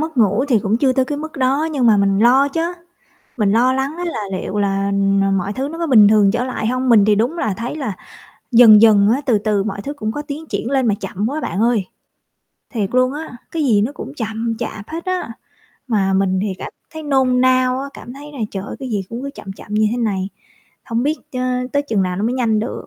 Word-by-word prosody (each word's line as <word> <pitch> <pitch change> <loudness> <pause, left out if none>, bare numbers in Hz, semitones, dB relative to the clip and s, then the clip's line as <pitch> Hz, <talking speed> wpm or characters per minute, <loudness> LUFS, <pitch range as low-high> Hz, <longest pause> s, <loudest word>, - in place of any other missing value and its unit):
mất 315 -2 -4
ngủ 220 +3 +3
thì 235 -5 +4
cũng 210 +1 0
chưa 260 +1 +2
tới 260 0 +1
cái 290 +2 -4
mức 310 0 -7
đó 275 +4 +1
nhưng 260 -5 +1
mà 215 -2 +5
mình 195 0 +2
lo 260 +5 +4
chớ, 325 +3 -2 0.8
mình 205 -3 +2
lo 245 +4 +3
lắng 270 +4 -2
á 355 - -4
là 330 -10 -3 0.2
liệu 210 - -4
là, 200 0 0 0.3
ờ, 195 - +1
mọi 195 +1 -1
thứ 265 +5 -3
nó 325 +3 -7
có 335 - -2
bình 215 -7 +7
thường 210 -2 +4
trở 240 +3 -1
lại 250 -4 -3
hông? 255 +1 -1
Mình 215 -4 +6
thì 210 0 +4
đúng 240 +11 0
là 215 - -1
thấy 240 +5 -4
là 250 -11 -4 0.6
dần 225 -3 +8
dần 210 -2 +6
á 270 - -1
từ 235 -4 +3
từ 205 -1 0
mọi 200 -1 -4
thứ 285 +7 -5
cũng 215 -6 -4
có 295 - -4
tiến 295 +2 -7
triển 225 0 -3
lên 265 -3 +2
mà 210 - +2
chậm 195 +2 -4
quá 300 +3 -3
bạn 195 - -3
ơi. 230 -4 +2 0.8
Thiệt 210 -6 -2
luôn 255 +1 +3
á, 300 -4 -7
cái 325 -2 -1
gì 220 -7 +3
nó 230 +7 -1
cũng 275 - -8
chậm 225 -2 -3
chạp 210 -1 -6
hết 330 +3 -6
á, 370 -9 -2 0.6
mà 200 -5 +1
mình 190 -1 +1
thì 200 -2 -2
cảm - - -7 0.2
thấy 315 0 -7
nôn 265 -3 +2
nao 255 0 +3
á, 280 - -5
cảm 245 - -10
thấy 290 +2 -11
là, 280 - -10
trời 195 - -5
ơi, - - -7
cái 265 -2 -6
gì 205 -3 -1
cũng 235 +2 -6
cứ 280 - -4
chậm 195 - -8
chậm 205 +2 -9
như 215 0 +3
thế 235 - -2
này, 200 -5 -1 0.6
hông 230 +1 -2
biết 300 +4 0 0.2
chớ 255 - -3 0.3
tới 285 - +1
chừng 220 -9 0
nào 180 -1 -2
nó 200 - -2
mới 240 +3 0
nhanh 230 -4 +1
được. 215 - -4
235 Hz, 255 wpm, -19 LUFS, 210-275 Hz, 0.8 s, dần